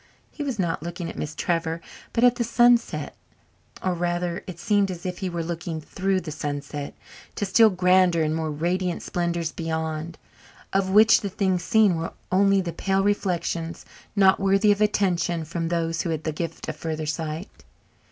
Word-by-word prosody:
He -, -, -8 dB
was 270 Hz, -5 st, -2 dB
not 175 Hz, -6 st, -1 dB
looking 170 Hz, +1 st, -5 dB
at -, -, -13 dB
Miss 150 Hz, 0 st, -5 dB
Trevor 165 Hz, -1 st, -1 dB, 0.3 s
but 230 Hz, -, 0 dB
at 245 Hz, -1 st, +5 dB
the 235 Hz, -, +1 dB
sunset 235 Hz, -, +2 dB, 0.7 s
or, 185 Hz, -, +1 dB
rather, 175 Hz, 0 st, -2 dB
it 180 Hz, -3 st, -7 dB
seemed 200 Hz, +2 st, +2 dB
as 175 Hz, -1 st, -6 dB
if 180 Hz, -1 st, -4 dB
he 190 Hz, -2 st, -2 dB
were 170 Hz, -1 st, -3 dB
looking 165 Hz, -1 st, -4 dB
through 190 Hz, +4 st, -1 dB
the 160 Hz, -, -6 dB
sunset 145 Hz, -1 st, -5 dB, 0.4 s
to 205 Hz, -, -1 dB
still 220 Hz, +3 st, +6 dB
grander 180 Hz, -2 st, +3 dB
and 155 Hz, 0 st, 0 dB
more 160 Hz, -1 st, -2 dB
radiant 175 Hz, +4 st, -1 dB
splendours 170 Hz, -2 st, -2 dB
beyond, 160 Hz, 0 st, -3 dB, 0.6 s
of 195 Hz, -1 st, +1 dB
which 215 Hz, +3 st, +6 dB
the 200 Hz, -, -3 dB
things 185 Hz, -2 st, 0 dB
seen 215 Hz, -4 st, +4 dB
were 165 Hz, +1 st, -4 dB, 0.2 s
only 195 Hz, +1 st, +4 dB
the 170 Hz, -2 st, -4 dB
pale 195 Hz, 0 st, 0 dB
reflections, 170 Hz, -4 st, -1 dB, 0.3 s
not 195 Hz, -2 st, +5 dB
worthy 195 Hz, +2 st, +4 dB
of 205 Hz, +1 st, +1 dB
attention 180 Hz, -5 st, +1 dB
from 165 Hz, +1 st, -3 dB
those 165 Hz, -1 st, -1 dB
who -, -, -3 dB
had 160 Hz, -1 st, -2 dB
the 155 Hz, -, -1 dB
gift 165 Hz, +2 st, -5 dB
of 155 Hz, -, -3 dB
further 155 Hz, 0 st, -4 dB
sight. 155 Hz, +4 st, -5 dB
175 Hz, 180 wpm, -25 LUFS, 165-195 Hz, 0.7 s, still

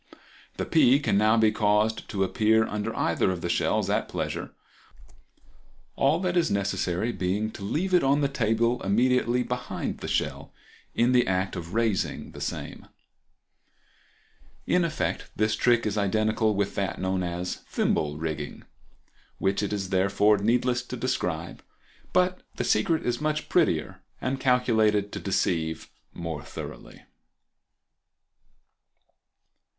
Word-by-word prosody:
The -, -, -2 dB
pea 140 Hz, -4 st, +5 dB
can 145 Hz, -, 0 dB
now 110 Hz, +2 st, +4 dB
be 110 Hz, -1 st, +4 dB
caused 105 Hz, +1 st, +1 dB
to 95 Hz, -2 st, 0 dB
appear 110 Hz, +3 st, +3 dB
under 105 Hz, 0 st, -3 dB
either -, -, +1 dB
of 90 Hz, -2 st, -3 dB
the 85 Hz, -, -3 dB
shells -, -, +1 dB
at -, -, 0 dB
pleasure, -, -, -3 dB, 1.5 s
all -, -, +2 dB
that 180 Hz, -2 st, -1 dB
is 170 Hz, -2 st, +3 dB
necessary 100 Hz, +1 st, -1 dB
being 105 Hz, +2 st, -1 dB
to 100 Hz, -, -9 dB
leave 175 Hz, -, -1 dB
it 180 Hz, -, +5 dB
on 140 Hz, +2 st, +3 dB
the 140 Hz, -, +3 dB
table 120 Hz, -2 st, +1 dB
immediately 125 Hz, +4 st, +2 dB
behind 125 Hz, 0 st, -4 dB
the -, -, -6 dB
shell -, -, -2 dB, 0.4 s
in 120 Hz, +2 st, +3 dB
the 125 Hz, -1 st, +4 dB
act 95 Hz, 0 st, 0 dB
of 85 Hz, +2 st, -6 dB
raising 115 Hz, -4 st, 0 dB
the -, -, -10 dB
same. -, -, -5 dB, 1.8 s
In 180 Hz, -, +2 dB
effect 160 Hz, -2 st, -2 dB
this 110 Hz, +1 st, +1 dB
trick 120 Hz, -1 st, +3 dB
is 105 Hz, 0 st, 0 dB
identical 110 Hz, +2 st, +1 dB
with 100 Hz, 0 st, -1 dB
that 95 Hz, -3 st, -2 dB
known 95 Hz, 0 st, -1 dB
as 90 Hz, 0 st, -3 dB
"Thimble 75 Hz, -1 st, 0 dB
Rigging," 75 Hz, -2 st, -5 dB, 0.7 s
which 95 Hz, +1 st, 0 dB
it 105 Hz, -, -2 dB
is 100 Hz, -2 st, -3 dB
therefore 100 Hz, +2 st, +3 dB
needless 120 Hz, +3 st, +1 dB
to 125 Hz, +1 st, -7 dB
describe, 90 Hz, -10 st, -2 dB, 0.5 s
but 185 Hz, 0 st, +2 dB
the -, -, -2 dB
secret 165 Hz, -2 st, +1 dB
is 120 Hz, +2 st, -1 dB
much 150 Hz, 0 st, -1 dB
prettier 120 Hz, -, +1 dB, 0.2 s
and 135 Hz, +1 st, -2 dB
calculated 110 Hz, -6 st, +2 dB
to -, -, -5 dB
deceive 80 Hz, -4 st, -1 dB, 0.2 s
more 80 Hz, -3 st, -5 dB
thoroughly. -, -, -9 dB
110 Hz, 135 wpm, -26 LUFS, 95-125 Hz, 1.8 s, pea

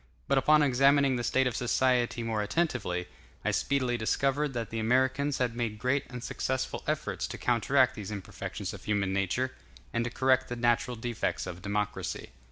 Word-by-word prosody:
But 140 Hz, -1 st, +4 dB
upon 150 Hz, +2 st, +5 dB
examining 135 Hz, 0 st, +4 dB
the 120 Hz, -, -2 dB
state 130 Hz, +2 st, +2 dB
of 125 Hz, -2 st, 0 dB
society 125 Hz, -1 st, +1 dB
more 110 Hz, -2 st, -1 dB
attentively, 100 Hz, -, -1 dB, 0.4 s
I -, -, +2 dB
speedily 130 Hz, -3 st, 0 dB
discovered 135 Hz, +5 st, 0 dB
that 115 Hz, -1 st, -3 dB
the 115 Hz, -, -2 dB
Americans 130 Hz, +5 st, +2 dB
had 120 Hz, -2 st, 0 dB
made 115 Hz, -3 st, -2 dB
great 130 Hz, +5 st, 0 dB
and 125 Hz, -1 st, -7 dB
successful 130 Hz, 0 st, -2 dB
efforts -, -, -1 dB
to -, -, -6 dB
counteract 125 Hz, +2 st, +3 dB
these 105 Hz, -4 st, -7 dB
imperfections 100 Hz, -3 st, -5 dB
of -, -, -10 dB
human 100 Hz, -2 st, 0 dB
nature, 100 Hz, +7 st, 0 dB, 0.4 s
and 115 Hz, -, +1 dB
to 120 Hz, -, -2 dB
correct 130 Hz, +1 st, +2 dB
the 120 Hz, -, -3 dB
natural 120 Hz, +1 st, +1 dB
defects 115 Hz, 0 st, -2 dB
of 90 Hz, -1 st, -7 dB
democracy. 105 Hz, +1 st, -3 dB
120 Hz, 175 wpm, -29 LUFS, 110-130 Hz, 0.4 s, upon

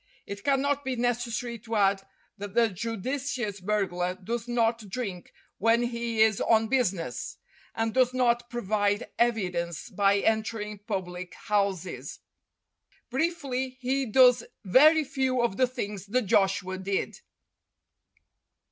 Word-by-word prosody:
It 200 Hz, 0 st, -7 dB
cannot 280 Hz, +1 st, +1 dB
be 260 Hz, -1 st, -2 dB
necessary 240 Hz, -1 st, -2 dB
to 225 Hz, +1 st, -5 dB
add 195 Hz, -1 st, +3 dB, 0.3 s
that 200 Hz, -1 st, -8 dB
the 235 Hz, -1 st, +4 dB
judicious 230 Hz, +2 st, -3 dB
burglar 180 Hz, -3 st, -1 dB
does 225 Hz, +5 st, -4 dB
not 230 Hz, -3 st, 0 dB
drink 195 Hz, -5 st, -5 dB, 0.3 s
when 230 Hz, +3 st, +3 dB
he 235 Hz, -2 st, +1 dB
is 220 Hz, -2 st, +2 dB
on 220 Hz, -1 st, +3 dB
business, 180 Hz, -, -1 dB, 0.4 s
and 225 Hz, -1 st, -1 dB
does 255 Hz, -1 st, +3 dB
not 240 Hz, -1 st, +1 dB
provide 205 Hz, -2 st, -1 dB
evidence 180 Hz, -6 st, -1 dB
by 200 Hz, +1 st, +3 dB
entering 215 Hz, -1 st, -1 dB
public 185 Hz, -4 st, -5 dB
houses. 200 Hz, -4 st, -2 dB, 0.9 s
Briefly, 265 Hz, -4 st, -2 dB
he 265 Hz, +1 st, -1 dB
does 250 Hz, +1 st, +6 dB, 0.2 s
very 305 Hz, -, +6 dB
few 265 Hz, -2 st, -1 dB
of 210 Hz, -4 st, 0 dB
the 255 Hz, -, +4 dB
things 205 Hz, -6 st, -5 dB
that 250 Hz, +5 st, +1 dB
Joshua 190 Hz, -1 st, +1 dB
did. 195 Hz, +1 st, -2 dB
225 Hz, 120 wpm, -27 LUFS, 200-250 Hz, 0.9 s, does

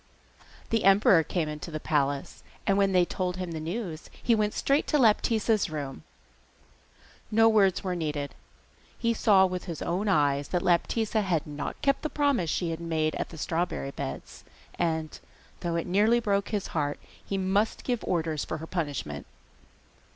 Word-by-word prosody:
The 225 Hz, -1 st, +2 dB
emperor 195 Hz, -3 st, +6 dB
came 160 Hz, 0 st, -2 dB
into 150 Hz, +2 st, -6 dB
the 155 Hz, -1 st, -4 dB
palace, 140 Hz, -2 st, -1 dB, 0.2 s
and 195 Hz, -, +3 dB
when 195 Hz, -1 st, +3 dB
they 180 Hz, -1 st, +4 dB
told 180 Hz, 0 st, -3 dB
him 180 Hz, -2 st, -4 dB
the 160 Hz, -, -4 dB
news 170 Hz, 0 st, -5 dB
he 235 Hz, -, +3 dB
went 215 Hz, -1 st, +1 dB
straight 280 Hz, +2 st, +1 dB
to 300 Hz, -, +2 dB
Laptitza's 220 Hz, -, +3 dB
room. 145 Hz, -, -5 dB, 1.3 s
No 225 Hz, +1 st, +5 dB
words 200 Hz, -4 st, +3 dB
were 185 Hz, -2 st, -1 dB
needed; 150 Hz, -4 st, -3 dB, 0.6 s
he 230 Hz, -1 st, +1 dB
saw 200 Hz, -4 st, +5 dB
with 180 Hz, -1 st, -3 dB
his 170 Hz, -4 st, -5 dB
own 185 Hz, +5 st, -1 dB
eyes 145 Hz, -6 st, +2 dB
that 180 Hz, -1 st, -1 dB
Laptitza 215 Hz, +5 st, +1 dB
had 175 Hz, -6 st, 0 dB
not 145 Hz, -1 st, -5 dB
kept 275 Hz, -1 st, +2 dB
the 310 Hz, -, -2 dB
promise 285 Hz, -, +1 dB
she 170 Hz, +1 st, -1 dB
had 165 Hz, -, -4 dB
made 160 Hz, -2 st, 0 dB
at -, -, -3 dB
the 165 Hz, -, -10 dB
strawberry 165 Hz, -3 st, -2 dB
beds, 70 Hz, -, -7 dB, 0.3 s
and, 160 Hz, -2 st, -2 dB, 0.4 s
though 170 Hz, -2 st, -2 dB
it 170 Hz, -, -1 dB
nearly 210 Hz, +6 st, +3 dB
broke 200 Hz, -3 st, 0 dB
his 205 Hz, -3 st, -2 dB
heart, 145 Hz, -2 st, -1 dB, 0.2 s
he 195 Hz, -, -3 dB
must 195 Hz, +3 st, 0 dB
give 245 Hz, -3 st, -1 dB
orders 160 Hz, -4 st, -1 dB
for -, -, -4 dB
her 160 Hz, -, -7 dB
punishment. 145 Hz, -, -4 dB
180 Hz, 170 wpm, -28 LUFS, 155-210 Hz, 1.3 s, emperor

